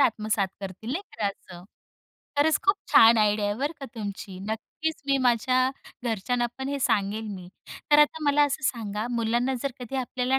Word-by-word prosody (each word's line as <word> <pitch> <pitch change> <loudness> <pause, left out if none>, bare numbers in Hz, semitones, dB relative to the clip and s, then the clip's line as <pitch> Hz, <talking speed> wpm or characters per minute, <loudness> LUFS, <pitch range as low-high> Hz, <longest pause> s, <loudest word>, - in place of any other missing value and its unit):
आत्मसात 215 -5 +2
करतील 195 +4 -7
नाही 370 - -2 0.2
का 210 - +1
असं. 180 -3 -7 0.7
खरंच 310 +2 +4
खूप 390 - +5 0.2
छान 225 0 +8
आयडिया 210 0 +2
आहे 205 - 0
बरं 285 +7 -2
का 275 - -5
तुमची. 200 -3 -6
नक्कीच 310 +8 -4
मी 275 - +3
माझ्या 255 +1 +2 0.3
घरच्यांना 240 +2 0
पण 265 +1 -3
हे 280 0 -2
सांगेल 215 -1 0
मी, 185 -3 -7 0.4
तर 295 - +7
आता 300 +1 +4
मला 290 0 +4
असं 275 -2 -2
सांगा 220 -3 -2
मुलांना 240 +2 0
जर 275 - -1
कधी 250 +2 -5
आपल्याला 255 0 0
235 Hz, 175 wpm, -26 LUFS, 210-270 Hz, 0.7 s, छान